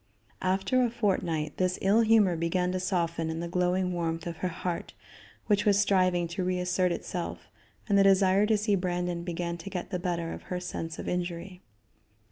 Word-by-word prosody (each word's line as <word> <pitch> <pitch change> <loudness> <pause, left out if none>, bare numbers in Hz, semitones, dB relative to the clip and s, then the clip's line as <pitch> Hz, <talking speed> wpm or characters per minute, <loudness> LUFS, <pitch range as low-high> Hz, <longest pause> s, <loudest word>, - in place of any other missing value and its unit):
After 190 +8 +1
a 240 - +2
fortnight, 175 -9 -1
this 185 -1 +1
ill 200 +4 +4
humor 215 -5 +4
began 180 +2 0
to 185 - -1
soften 170 -3 -1
in 160 0 -3
the 170 - -3
glowing 180 +1 0
warmth 165 -1 -2
of 170 -2 -5
her 185 - -1
heart, 175 0 -4 0.5
which 205 -2 +2
was 200 -1 +4
striving 185 -4 +2
to 185 +2 -3
reassert 180 0 +1
itself, 175 0 -5 0.4
and 200 -2 +4
the - - +6
desire 195 +1 +4
to 220 -1 +3
see 210 0 0
Brandon 180 -2 -1
began 170 0 -3
to 170 +4 -8
get 185 0 -5
the 180 - -1
better 170 -2 -2
of - - -8
her 180 - -2
sense 165 -2 -5
of - - -6
injury. 180 +1 -4
180 Hz, 185 wpm, -28 LUFS, 170-195 Hz, 0.5 s, the